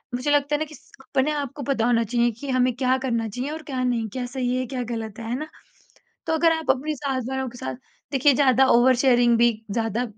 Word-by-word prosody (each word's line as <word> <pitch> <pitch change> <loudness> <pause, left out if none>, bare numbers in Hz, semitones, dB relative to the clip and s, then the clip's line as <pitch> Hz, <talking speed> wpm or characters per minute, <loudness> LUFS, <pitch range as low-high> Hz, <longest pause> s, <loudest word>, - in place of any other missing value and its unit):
मुझे 255 +4 -1
लगता 290 0 +2
है - - -1
ना 310 - -1
किस 305 -3 -16
अपने 270 +2 0
आप 285 -4 -3
को 290 - -6
पता 250 -3 0
होना 235 -1 +3
चाहिए 235 +2 +1
कि 280 - -6
हमें 255 -1 +2
क्या 255 0 +1
करना 235 -4 -1
चाहिए 250 +6 -4
और 315 +1 -6
क्या 265 -4 -3
नहीं, 240 -3 0
क्या 250 +4 -4
सही 250 0 -2
है, 255 - -1
क्या 255 0 -4
ग़लत 225 -2 -5
है, 225 - -6
है 240 - -1
ना? 310 - -5 0.8
तो 320 - 0
अगर 325 +1 +4
आप 320 -3 -1
अपनी 280 +4 0
साथ 275 -2 -2
वालों 265 0 -2
के 245 +1 -11
साथ 130 - -4 0.4
देखिए 280 +1 +4
ज़्यादा 265 -1 +4
ओवर 250 +2 +5
शेयरिंग 240 -2 +4
भी 235 0 +5 0.2
ज़्यादा 225 +2 -1
255 Hz, 240 wpm, -24 LUFS, 240-280 Hz, 0.8 s, ओवर